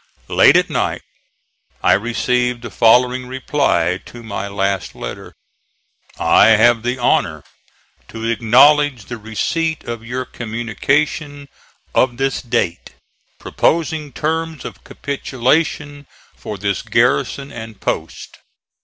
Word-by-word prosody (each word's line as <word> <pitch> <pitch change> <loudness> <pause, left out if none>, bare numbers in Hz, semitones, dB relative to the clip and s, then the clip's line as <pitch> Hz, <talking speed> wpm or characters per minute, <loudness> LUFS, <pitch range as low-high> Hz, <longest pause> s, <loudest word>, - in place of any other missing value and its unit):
Late - - +6
at - - +2
night - - -2 0.8
I - - +5
received 125 +3 0
the 115 - -7
following 125 +5 +3
reply 125 - 0
to 120 -1 -11
my 100 -2 -5
last 100 -1 -2
letter: - - -8 0.8
"I - - +5
have 120 +1 +4
the 120 +2 -2
honor 80 - +1 0.6
to 115 0 -7
acknowledge 125 +2 +4
the 120 - -6
receipt 155 - -2
of 115 -1 -6
your 125 +2 -4
communication 140 +6 -2 0.4
of 125 -2 +2
this 135 0 -1
date, 115 -9 -2 0.4
proposing 155 -2 -1
terms 160 +3 -3
of - - -9
capitulation 145 +1 -2 0.3
for 105 - -7
this 100 0 -2
garrison 135 +3 0
and 110 -3 -9
post. - - -4
125 Hz, 110 wpm, -18 LUFS, 110-140 Hz, 0.8 s, Late